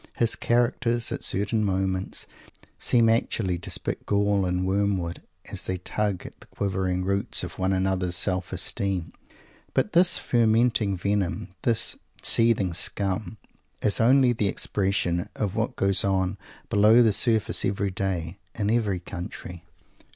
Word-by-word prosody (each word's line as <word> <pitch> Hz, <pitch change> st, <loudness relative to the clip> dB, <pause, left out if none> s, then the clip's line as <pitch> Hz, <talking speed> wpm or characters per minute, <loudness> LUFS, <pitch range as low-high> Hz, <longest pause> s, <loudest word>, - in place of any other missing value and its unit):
His 115 Hz, -1 st, +1 dB
characters, 120 Hz, 0 st, +1 dB
at -, -, -4 dB
certain 105 Hz, +3 st, 0 dB
moments, 95 Hz, -1 st, -2 dB, 0.5 s
seem 115 Hz, -2 st, +3 dB
actually 110 Hz, -5 st, 0 dB
to 85 Hz, -, -6 dB
spit -, -, -4 dB
gall 100 Hz, -2 st, +1 dB
and 90 Hz, +1 st, -1 dB
wormwood, 95 Hz, -3 st, -1 dB, 0.3 s
as -, -, -2 dB
they 95 Hz, -, -2 dB
tug 100 Hz, +1 st, -2 dB
at -, -, -11 dB
the -, -, -16 dB
quivering 95 Hz, -2 st, -2 dB
roots 100 Hz, +1 st, -1 dB
of -, -, -7 dB
one 95 Hz, +1 st, +1 dB
another's 95 Hz, -1 st, 0 dB
self 95 Hz, 0 st, 0 dB
esteem. 95 Hz, -1 st, -2 dB, 0.6 s
But 210 Hz, -, +1 dB
this 175 Hz, +1 st, +4 dB
fermenting 115 Hz, -3 st, +2 dB
venom, 100 Hz, 0 st, -1 dB
this 115 Hz, -2 st, +3 dB, 0.3 s
seething 115 Hz, -6 st, +4 dB
scum, 100 Hz, +3 st, -1 dB, 0.5 s
is 105 Hz, +2 st, +2 dB
only 125 Hz, +1 st, +5 dB
the 110 Hz, -3 st, 0 dB
expression 95 Hz, -3 st, -1 dB
of 105 Hz, -2 st, -2 dB
what 110 Hz, 0 st, -1 dB
goes 95 Hz, -2 st, +2 dB
on 95 Hz, 0 st, 0 dB, 0.3 s
below 110 Hz, +4 st, +6 dB
the 110 Hz, -3 st, +3 dB
surface 110 Hz, 0 st, +1 dB
every 100 Hz, 0 st, -1 dB
day, 90 Hz, -2 st, -3 dB, 0.2 s
in 105 Hz, -2 st, 0 dB
every 105 Hz, -6 st, 0 dB
country. 90 Hz, -1 st, -8 dB
100 Hz, 140 wpm, -25 LUFS, 95-110 Hz, 0.6 s, below